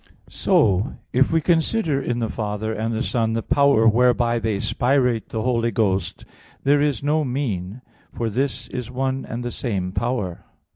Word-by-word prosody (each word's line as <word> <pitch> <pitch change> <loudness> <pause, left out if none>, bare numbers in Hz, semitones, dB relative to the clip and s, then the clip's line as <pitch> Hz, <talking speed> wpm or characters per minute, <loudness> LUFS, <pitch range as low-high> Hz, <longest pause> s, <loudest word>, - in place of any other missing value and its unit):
So 100 +7 +2 0.2
if 130 +2 +3
we 165 0 +2
consider 165 -2 +1
in 120 -2 -2
the 115 -2 -1
Father 110 0 -3
and 110 +1 -2
the 115 +2 -1
Son 115 -3 0
the 115 0 -1
power 140 -5 +4
whereby 120 +1 +3
they 110 -2 -1
spirate 125 -1 +1
the 110 -1 -3
Holy 120 -2 +1
Ghost, 100 -6 -1 0.4
there 145 +1 +4
is 145 -4 0
no 150 +2 +2
mean, 125 -5 -3 0.3
for 115 - -3
this 130 +6 -2
is 125 -2 -5
one 130 +1 -2
and 120 +2 -5
the 120 - -3
same 95 -8 -3
power. 105 -5 -2
120 Hz, 165 wpm, -22 LUFS, 110-135 Hz, 0.4 s, power